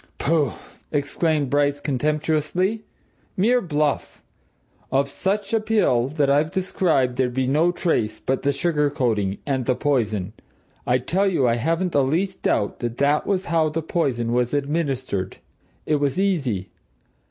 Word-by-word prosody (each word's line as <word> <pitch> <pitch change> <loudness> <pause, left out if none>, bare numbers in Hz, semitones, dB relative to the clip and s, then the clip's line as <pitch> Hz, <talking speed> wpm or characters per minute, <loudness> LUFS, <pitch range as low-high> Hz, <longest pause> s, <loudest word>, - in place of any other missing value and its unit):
"Pooh!" 155 -1 +1 0.4
exclaimed 145 0 0
Bryce 145 0 +2
contemptuously. 155 - 0 0.5
"Mere 240 +6 +3
bluff! 150 -6 -1 0.7
Of 135 +1 +2
such 195 +8 -2
a 225 - +4
pill 210 - +2
as 150 - -11
that 145 -2 +3
I've 145 +3 +3
described 160 -9 0
there'd 125 -2 0
be 130 0 +1
no 155 +7 +3
trace 115 - -1
but 130 0 -1
the 140 - +2
sugar 150 0 +1
coating 110 -8 0
and 130 -4 -1
the 130 - +2
poison. 110 -11 -1 0.5
I 125 - +4
tell 185 +10 0
you, 155 -9 +2
I 115 0 +2
haven't 165 +8 0
the 140 -3 +3
least 175 +8 -1
doubt 100 - 0
that 120 0 -4
that 145 +2 +2
was 190 -2 0
how 165 -2 +2
the 160 +1 -3
poison 125 -8 -1
was 125 +2 +1
administered. 135 - -2 0.5
It 150 - +2
was 145 +3 0
easy. 135 - 0
145 Hz, 155 wpm, -23 LUFS, 130-165 Hz, 0.7 s, a